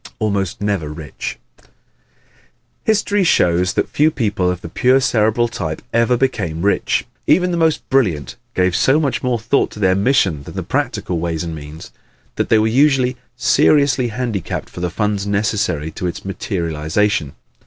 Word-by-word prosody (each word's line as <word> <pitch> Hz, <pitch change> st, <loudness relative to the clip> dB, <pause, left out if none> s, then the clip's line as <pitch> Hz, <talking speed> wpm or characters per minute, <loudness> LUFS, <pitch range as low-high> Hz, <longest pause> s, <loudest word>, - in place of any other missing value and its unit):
Almost 100 Hz, -4 st, -1 dB
Never 100 Hz, -7 st, -1 dB
Rich 75 Hz, -2 st, -6 dB, 0.3 s
¶ -, -, -26 dB, 1.2 s
History 205 Hz, -2 st, +2 dB
shows 90 Hz, -, +2 dB
that -, -, 0 dB
few 150 Hz, +2 st, +2 dB
people 105 Hz, -10 st, 0 dB
of 90 Hz, -1 st, -3 dB
the -, -, -7 dB
pure 125 Hz, +10 st, +3 dB
Cerebral 115 Hz, -1 st, +2 dB
type 80 Hz, -8 st, -5 dB
ever 115 Hz, +1 st, +3 dB
became 85 Hz, -11 st, -1 dB
rich. 100 Hz, -, +1 dB, 0.2 s
Even 180 Hz, +3 st, +3 dB
the -, -, 0 dB
most 160 Hz, -2 st, +1 dB
brilliant 80 Hz, -, +1 dB, 0.2 s
gave 90 Hz, -1 st, +2 dB
so 135 Hz, +10 st, +3 dB
much 140 Hz, -6 st, -1 dB
more 125 Hz, -2 st, 0 dB
thought 115 Hz, +5 st, +1 dB
to -, -, -11 dB
their 95 Hz, -2 st, +3 dB
mission 100 Hz, -, +2 dB
than -, -, -11 dB
the -, -, -3 dB
practical 90 Hz, -2 st, -2 dB
ways 85 Hz, -1 st, -2 dB
and 85 Hz, -1 st, -5 dB
means 75 Hz, 0 st, -9 dB, 0.4 s
that -, -, -1 dB
they 110 Hz, -, +5 dB
were 110 Hz, -, +3 dB
usually 130 Hz, +1 st, +3 dB, 0.2 s
seriously 140 Hz, -4 st, +3 dB
handicapped 115 Hz, -5 st, -4 dB
for -, -, -9 dB
the 90 Hz, 0 st, -1 dB
funds 100 Hz, +2 st, -1 dB
necessary 100 Hz, -7 st, -1 dB
to 90 Hz, -, -4 dB
its 85 Hz, -, -6 dB
materialization. 85 Hz, -3 st, -1 dB
105 Hz, 165 wpm, -18 LUFS, 85-125 Hz, 1.2 s, they